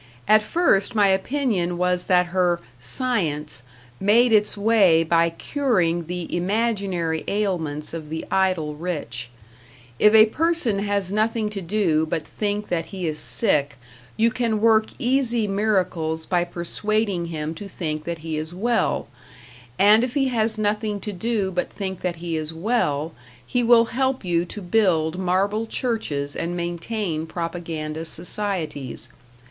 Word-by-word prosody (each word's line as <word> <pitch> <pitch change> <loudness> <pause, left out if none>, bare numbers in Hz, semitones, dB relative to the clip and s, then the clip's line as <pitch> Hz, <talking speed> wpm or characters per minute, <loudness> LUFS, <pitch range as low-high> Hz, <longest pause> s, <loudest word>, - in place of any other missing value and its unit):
At 215 0 +6
first 215 - +2
my 205 -2 +5
opinion 190 -4 0
was 180 0 0
that 180 -1 +4
her 180 -2 +2 0.2
"Science" 150 - -2 0.4
made 225 +4 +4
its 210 -1 +3
way 200 -6 +4
by 165 0 +3
curing 175 - 0
the 180 -1 -4
imaginary 190 -4 -1
ailments 165 -8 -1
of 160 -2 -6
the 160 +1 -4
idle 185 -6 +1
rich. 145 -8 -4 0.7
If 210 +1 +6
a 215 0 +9
person 300 -4 0
has 200 -2 -1
nothing 215 0 0
to 200 -2 -5
do 170 -4 +1
but 155 -1 -2
think 210 0 -3
that 170 -2 -1
he 190 -3 -5
is 155 -2 -2
sick, 145 -10 +1 0.4
you 230 +1 +3
can 230 -3 0
work 220 0 +4
easy 240 -3 +1
miracles 185 -6 0
by 175 0 +1
persuading 185 +2 -1
him 155 -1 -4
to 200 +5 -8
think 155 -5 -4
that 170 -2 -5
he 160 -1 -2
is 155 +3 -4
well; 235 +5 0 0.7
and 210 +3 +6
if 250 +1 -3
he 270 -2 +2
has 225 -2 +1
nothing 210 0 -1
to 210 +1 -4
do 200 0 -1
but 180 -1 -2
think 190 -2 -5
that 180 -2 -2
he 170 0 -4
is 155 0 -3
well, 165 -5 -1 0.3
he 245 - 0
will 235 -1 +6
help 260 -1 -1
you 170 -1 +1
to 200 +3 -8
build 175 -4 +2
marble 195 +4 0
churches 155 - -2
and 175 +1 -3
maintain 170 -1 -3
propaganda 165 -2 -4
societies. 165 - -3
185 Hz, 145 wpm, -23 LUFS, 165-215 Hz, 0.7 s, a